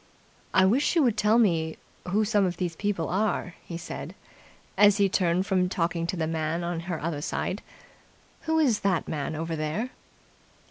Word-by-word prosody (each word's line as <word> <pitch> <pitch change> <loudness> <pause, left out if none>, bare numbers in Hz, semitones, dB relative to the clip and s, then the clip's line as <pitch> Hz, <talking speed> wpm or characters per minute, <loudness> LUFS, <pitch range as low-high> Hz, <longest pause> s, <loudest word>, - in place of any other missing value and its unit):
"I 190 - +5
wish 255 - +2
you 325 - +5
would 240 -5 +2
tell 210 +1 +3
me 165 -8 +2 0.3
who 210 +4 +2
some 205 -1 +2
of 180 -2 -1
these 175 -3 -2
people 195 -4 -1
are," 195 -2 0
he 170 - -6
said, 170 - -7 0.6
as 205 -1 +6
she 200 -1 +3
turned 180 -1 +1
from 185 -2 +1
talking 170 -2 -1
to 180 - -2
the 160 - 0
man 160 +1 -2
on 170 -1 -2
her 165 -3 -2
other 155 -2 -3
side. - - -2 0.9
"Who 320 0 +2
is 265 -9 +3
the 190 -4 +1
man 155 0 -3
over 165 +1 -3
there?" 160 +11 -2
180 Hz, 180 wpm, -27 LUFS, 165-205 Hz, 0.9 s, as